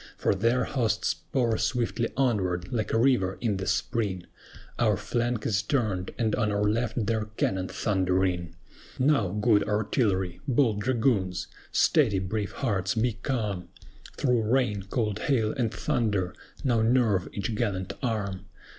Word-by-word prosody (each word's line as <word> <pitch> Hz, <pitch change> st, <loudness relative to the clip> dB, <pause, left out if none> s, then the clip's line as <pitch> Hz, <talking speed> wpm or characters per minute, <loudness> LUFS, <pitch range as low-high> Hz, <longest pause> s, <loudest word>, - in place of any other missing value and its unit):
For -, -, +2 dB
their 115 Hz, +6 st, +2 dB
hosts 110 Hz, -5 st, 0 dB
pour 120 Hz, -4 st, -1 dB
swiftly 115 Hz, +1 st, 0 dB
onward, 95 Hz, -9 st, 0 dB
like 110 Hz, -3 st, -1 dB
a -, -, +2 dB
river 115 Hz, -7 st, +2 dB
in 110 Hz, -5 st, 0 dB
the 95 Hz, +1 st, -4 dB
spring, 100 Hz, -3 st, -1 dB, 0.5 s
Our -, -, +3 dB
flank 120 Hz, -2 st, -1 dB
is 100 Hz, -2 st, +1 dB
turned, 105 Hz, -10 st, -1 dB
and 110 Hz, -3 st, 0 dB
on 110 Hz, -3 st, +1 dB
our 100 Hz, 0 st, 0 dB
left 110 Hz, +1 st, 0 dB
their 110 Hz, 0 st, 0 dB
cannon 95 Hz, -1 st, 0 dB
thundering. 90 Hz, -4 st, 0 dB, 0.4 s
Now, 130 Hz, -6 st, +3 dB
good 105 Hz, +3 st, +2 dB
Artillery! 105 Hz, -4 st, 0 dB
bold 120 Hz, -6 st, +2 dB
Dragoons! 110 Hz, -6 st, 0 dB, 0.2 s
Steady, 125 Hz, -11 st, +3 dB
brave 95 Hz, +2 st, -2 dB
hearts, 100 Hz, -6 st, -1 dB
be 115 Hz, +1 st, +1 dB
calm! 105 Hz, -, -3 dB, 0.5 s
Through 125 Hz, -4 st, +2 dB
rain, 115 Hz, -6 st, +1 dB
cold 105 Hz, -3 st, -1 dB
hail, 115 Hz, -4 st, +1 dB
and 120 Hz, -5 st, 0 dB
thunder, 100 Hz, -6 st, 0 dB, 0.3 s
now 120 Hz, -4 st, +2 dB
nerve 110 Hz, -5 st, +2 dB
each 105 Hz, +2 st, -3 dB
gallant 100 Hz, -5 st, -2 dB
arm! 105 Hz, -7 st, -2 dB
110 Hz, 140 wpm, -27 LUFS, 95-120 Hz, 0.5 s, Our